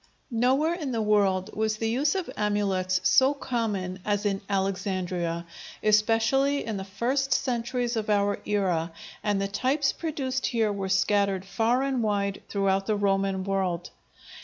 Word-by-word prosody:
Nowhere 260 +8 +2
in 300 -7 -4
the 230 - 0
world 200 -3 +2
was 220 0 0
the 225 - -1
use 285 +7 +1
of 375 -3 -2
amulets 195 -3 0
so 265 +2 +4
common 210 -9 -2
as 205 +1 -1
in 195 -1 0
Alexandria, 185 -3 -1 0.4
especially 225 +6 +3
in 220 -3 -3
the 190 - -4
first 245 +8 -1
centuries 245 -1 -1
of 215 -1 -2
our 205 -1 +2
era, 180 -5 0 0.3
and 205 -2 +1
the 195 - 0
types 260 +8 +1
produced 270 -5 -2
here 225 -4 +1
were 195 -1 -3
scattered 190 0 +2
far 225 +6 +1
and 270 -3 0
wide 200 -2 -1
throughout 195 -1 +1
the 215 - +2
Roman 195 -1 +1
world. 185 -3 -1
205 Hz, 150 wpm, -27 LUFS, 195-245 Hz, 0.4 s, so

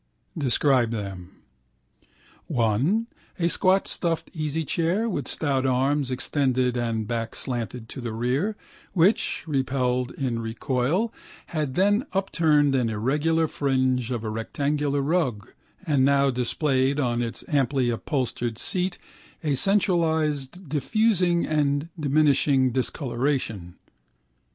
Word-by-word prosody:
Describe 130 -3 +2
them. 100 -5 -5 1.2
One: 125 - +1 0.3
a 170 - +1
squat 185 +3 +2
stuffed 165 -2 -2
easychair, 165 - -1
with 145 - -3
stout 140 -4 +1
arms 135 +2 +1
extended 130 -1 0
and 115 -3 -1
back 115 -1 -3
slanted 120 -2 -4
to 130 - -7
the 120 -2 -4
rere, 125 - -1 0.4
which, 185 0 +2
repelled 130 -4 0
in 125 -4 -2
recoil, 130 - -1 0.4
had 150 -5 -2
then 205 +8 +2
upturned 155 -7 +2
an 125 -4 +1
irregular 150 +9 +1
fringe 130 -4 0
of 120 -3 -3
a 110 - -3
rectangular 140 +5 -1
rug 135 - -1 0.3
and 145 -5 +2
now 140 0 +4
displayed 130 +2 +1
on 120 -3 0
its 115 -1 -4
amply 135 -3 +1
upholstered 120 -2 -2
seat 180 +5 0 0.5
a 150 -2 +1
centralised 160 -2 +1
diffusing 175 - +2
and 145 0 0
diminishing 140 -3 +3
discolouration. 125 - -2
140 Hz, 110 wpm, -25 LUFS, 125-160 Hz, 1.2 s, now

